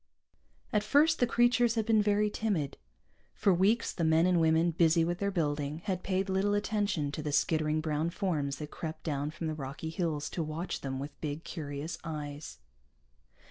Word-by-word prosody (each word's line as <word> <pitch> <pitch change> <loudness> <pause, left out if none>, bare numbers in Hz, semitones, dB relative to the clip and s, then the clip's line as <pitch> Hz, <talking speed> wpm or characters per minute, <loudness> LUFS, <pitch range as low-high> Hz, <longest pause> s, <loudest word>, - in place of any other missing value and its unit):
At 210 - +3
first 295 +9 +3
the 245 - +3
creatures 240 -1 +3
had 220 -2 0
been 220 -1 +4
very 210 0 +2
timid. 190 -12 -1 0.6
For 195 - +3
weeks 205 +6 +2
the 170 - -2
men 160 +1 +4
and 180 -2 +3
women, 160 +1 +3
busy 165 0 +3
with 175 +1 -2
their 200 - 0
building, 150 -3 -2
had 185 -3 -1
paid 190 +1 -1
little 195 +2 +1
attention 205 -8 0
to 155 - -4
the 150 0 -3
skittering 155 +1 +1
brown 155 +1 -1
forms 165 -7 -1
that 150 0 -7
crept 160 -1 -6
down 145 -2 -2
from 165 +2 -6
the 155 - -1
rocky 145 +2 -5
hills 160 -4 -2
to 170 - -2
watch 160 +3 -4
them 135 -1 -3
with 140 +2 -7
big, 150 +1 -4
curious 150 -1 -5
eyes. 150 -2 -6
165 Hz, 180 wpm, -31 LUFS, 150-200 Hz, 0.6 s, been